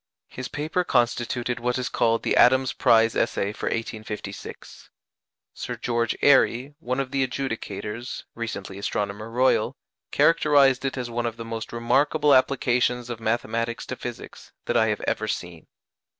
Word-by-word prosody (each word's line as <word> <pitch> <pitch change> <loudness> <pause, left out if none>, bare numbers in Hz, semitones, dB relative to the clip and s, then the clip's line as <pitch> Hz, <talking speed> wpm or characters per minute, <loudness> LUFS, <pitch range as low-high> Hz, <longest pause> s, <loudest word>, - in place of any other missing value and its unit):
His 130 - -6
paper 155 +5 -2
constituted 120 -2 0
what 125 +1 -1
is 125 -1 -2
called 115 0 +1
"The - - +1
Adams 130 +1 +5
Prize 115 -2 +4
Essay" 100 +1 0
for - - -5
1856. 110 -3 -6 0.6
Sir - - -5
George 115 -1 -1
Airy, 135 -1 +4
one 130 -4 -2
of 135 -1 -2
the 135 -1 0
adjudicators 120 -2 -5
(recently 100 -4 -6
Astronomer 105 +2 -3
Royal), 125 +3 +2 0.3
characterized 140 -5 +4
it 135 - -2
as 120 -2 -4
"one 120 0 -1
of 115 -1 -5
the 115 - -7
most 115 0 -5
remarkable 140 +5 +2
applications 125 -2 +2
of 115 - -5
mathematics 115 +1 -2
to - - -5
physics - - -9
that - - -1
I 110 - +4
have 105 -1 -1
ever 110 - -1
seen." 85 -5 -5
120 Hz, 150 wpm, -25 LUFS, 115-130 Hz, 0.6 s, Adams